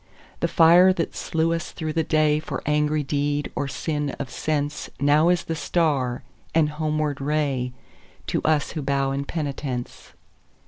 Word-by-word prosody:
The - - +1
fire 175 +3 +6
that 165 -3 -3
slew 165 +1 0
us 165 0 -3
through 155 -2 -4
the 165 0 +1
dayFor 155 -1 +1
angry 150 0 +1
deed 145 +1 -1
or 145 - -1
sin 145 +1 -3
of 140 - -5
senseNow 145 +2 +1
is 180 +1 +1
the 165 - -3
star 145 -7 0 0.3
and 155 -2 +4
homeward 150 -1 -1
rayTo 135 -3 -3
us 155 -2 +1
who 160 - -4
bow 135 -1 0
in 140 +1 -2
penitence. 140 -5 -5
150 Hz, 140 wpm, -24 LUFS, 140-160 Hz, 0.3 s, fire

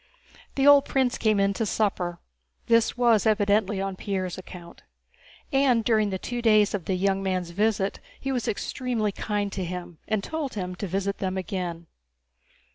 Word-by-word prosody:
The 270 - +2
old 285 -1 +7
prince 260 -2 0
came 215 -2 +2
in 200 0 +2
to 225 - -2
supper; 185 -5 -1 0.5
this 230 0 +3
was 230 -4 +4
evidently 205 -1 +2
on 195 0 -2
Pierre's 185 -2 -3
account. 180 -2 -11 0.7
And 265 -4 +3
during 215 -2 +2
the 190 - -2
two 240 +5 -4
days 215 -3 +4
of 195 -5 -3
the 190 - 0
young 195 +1 +1
man's 185 -3 -2
visit 205 +1 0 0.2
he 270 - -3
was 245 -4 -2
extremely 225 -1 -1
kind 205 0 -2
to 190 - -3
him 175 -2 -6
and 215 -2 0
told 315 -6 -4
him 185 -3 -3
to 200 - -4
visit 195 +2 -2
them 190 -1 -2
again. 175 -2 -4
200 Hz, 170 wpm, -26 LUFS, 185-225 Hz, 0.7 s, old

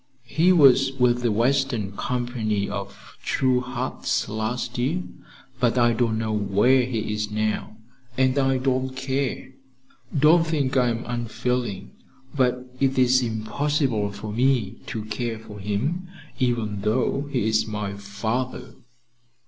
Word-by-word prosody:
He 165 +8 +3
was 135 -5 +6
with 125 -2 +2
the 120 -2 +1
western 120 -3 +1
company 120 -5 -1
of 100 0 -7
'True 130 -1 +2
Hearts' 125 0 -2
last 115 +3 -3
year, 155 +9 0 0.6
but 125 -1 +2
I 120 -1 +4
don't 115 -1 +1
know 110 -1 -1
where 105 +5 +3
he 110 -4 -2
is 105 0 -2
now, 110 0 -2 0.4
and 130 0 +3
I 135 -1 +2
don't 130 0 -1
care. 130 0 -2 0.7
Don't 155 +4 +6
think 140 -5 0
I'm 120 -2 +1
unfeeling; 120 -3 -2 0.4
but 125 -1 +1
it 135 -1 +1
is 130 0 +4
impossible 115 0 -1
for 105 +1 -7
me 120 -4 +1
to 110 -2 -4
care 115 +1 -3
for 110 -2 -11
him, 125 - -2 0.3
even 115 -5 0
though 130 +6 0
he 120 -5 0
is 110 0 +2
my 105 -2 -3
father." 110 +6 -4
120 Hz, 130 wpm, -24 LUFS, 110-130 Hz, 0.7 s, was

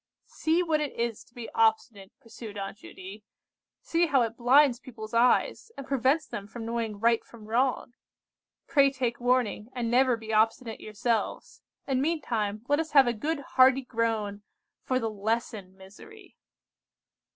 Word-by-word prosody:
"See 330 +3 0
what 315 -3 0
it 295 - -3
is 235 -2 -3
to - - -28
be 240 -2 -7
obstinate," 220 -3 0
pursued 230 -4 -10
Aunt 200 +1 -6
Judy. 195 +3 -11 0.6
"See 335 +1 +1
how 270 -5 +3
it 225 0 -3
blinds 250 +1 +4
people's 220 -4 -10
eyes, 245 - +2
and 275 - -7
prevents 275 +4 +1
them 200 -7 -7
from 225 +1 -8
knowing 230 -3 -3
right 230 +1 +2
from 225 -3 -15
wrong! 245 +2 0 0.7
Pray 280 -3 +4
take 255 -3 -3
warning, 245 -3 0
and 235 -2 -2
never 250 -1 +3
be 220 0 -6
obstinate 225 +1 +1
yourselves; 215 +2 -3 0.2
and 265 -2 0
meantime, 230 -9 -2
let 290 +1 +2
us 320 -1 -4
have 275 -2 +7
a 240 - 0
good 295 +7 -3
hearty 260 0 +4
groan 225 -4 -2 0.4
for 255 - -1
the 230 - -1
lesson 210 -2 -3
misery." 370 - -15
235 Hz, 155 wpm, -27 LUFS, 220-270 Hz, 0.7 s, have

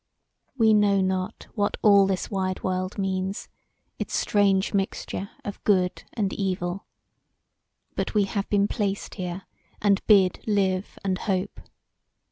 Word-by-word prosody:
"We 220 -3 +5
know 205 -2 +4
not 185 -1 -2
what 205 -3 0
all 200 -2 +6
this 190 -2 -2
wide 185 -2 -2
world 185 +1 -2
means; 190 0 -2 0.5
its - - -3
strange 200 -1 +2
mixture 195 0 -2 0.2
of 205 - -6
good 185 -3 +1
and 200 -4 -1
evil. 185 -1 -2 1.1
But - - -2
we 210 - +5
have 200 0 -3
been 200 -1 +3
placed 200 -2 -2
here 185 -1 -5 0.4
and 200 -1 +3
bid 195 -4 +4
live 195 -2 0
and 185 -1 0
hope. 190 -3 -2
195 Hz, 130 wpm, -25 LUFS, 185-205 Hz, 1.1 s, all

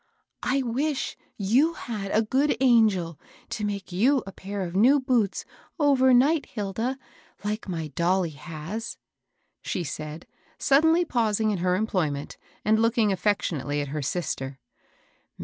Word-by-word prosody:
" - - -55 0.2
I 270 - +1
wish 270 +4 -1 0.2
you 245 +12 +3
had 210 -8 -5
a 220 +3 +2
good 270 +7 +1
angel 215 - +3 0.3
to 210 - -4
make 200 -2 -3
you 245 +9 +3
a 195 - -7
pair 195 +1 -5
of 175 0 -5
new 255 +9 +5
boots, 245 -7 0 0.3
overnight, 275 0 +4
Hilda, 220 +5 -3 0.5
like 210 0 -3
my 165 -3 -3
dolly 175 +3 +1
has! 160 +9 -6 0.3
" - - -54 0.3
she 180 - -3
said, 155 +1 -6 0.3
suddenly 320 +5 +4
pausing 220 -5 +1
in 195 - -2
her 180 +1 +2
employment, 175 -9 -2 0.3
and 220 +1 +3
looking 230 -2 +3
affectionately 180 -7 0
at 145 -1 -3
her 150 +1 -3
sister. 135 -3 -3
210 Hz, 140 wpm, -26 LUFS, 175-250 Hz, 0.5 s, new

